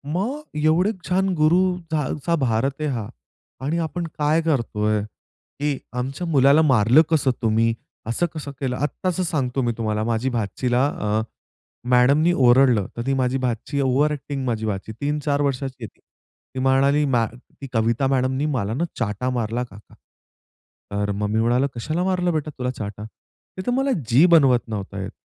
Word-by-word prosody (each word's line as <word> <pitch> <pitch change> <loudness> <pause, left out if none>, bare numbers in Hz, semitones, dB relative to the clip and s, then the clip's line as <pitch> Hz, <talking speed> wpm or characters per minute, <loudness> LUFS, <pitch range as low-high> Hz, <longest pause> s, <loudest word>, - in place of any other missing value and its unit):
मग 235 +11 -1 0.2
एवढे 170 +6 +3 0.2
छान 190 +1 +2
गुरु 155 +3 +4 0.3
जा 150 -3 0
जांचा 170 +3 -1
भारत 115 +3 +1
आहे 150 - 0
हा. 115 -6 -3 0.6
आणि 155 +4 0
आपण 170 +2 -4
काय 150 +2 +2
करतोय? 110 -9 0 0.6
की 145 -2 0 0.2
आमच्या 135 +7 -3
मुलाला 140 0 +5
मारलं 130 -1 +5
कसं 145 -5 +2
तुम्ही? 115 0 +2 0.3
असं 120 +9 0
कसं 145 -2 -6
केलं? 130 -2 -2
आत्ताचं 180 +6 -2
सांगतो 135 -5 -1
मी 120 -1 +1
तुम्हाला, 110 -2 -1
माझी 115 +3 0
भाचीला 120 +3 0
अ, 105 -5 -1 0.7
मॅडमनी 140 +7 +4
ओरडलं, 125 - +4
तर - - -2
ती 135 - +2
माझी 130 0 +1
भाची 125 +3 -2
ओव्हर 135 +3 +2
ॲक्टिंग 140 -2 -4
माझी 110 -3 -1
भाची. 105 0 -3
3-4 145 0 0
वर्षाची 135 -3 -2
आहे - - -4
ती. - - -25 0.6
ती - - -2
म्हणाली, 135 +3 +3
"मॅ 120 -4 +2 0.5
कविता 115 +4 +1
मॅडमनी 130 +1 0
मला 115 -8 -1
ना, 155 +7 -1 0.2
चाटा 115 +2 -1
मारला 120 -1 -1
काका." 105 -3 -14 1.0
तर 100 0 -1
मग 105 +1 -2
मी 110 +1 +1
म्हणाला, 125 +4 +2
"कशाला 155 +9 -2
मारलं 180 -2 0
बेटा 155 -1 -2
तुला 125 0 -2
चाटा?" 105 -3 -7
"ते 185 - -13
तर - - +2
मला, 270 +2 +1 0.2
जी 135 +8 +6
बनवत 130 -7 +5
नव्हता 100 -2 -5
येत." 100 +2 -5
130 Hz, 165 wpm, -22 LUFS, 115-150 Hz, 1.0 s, जी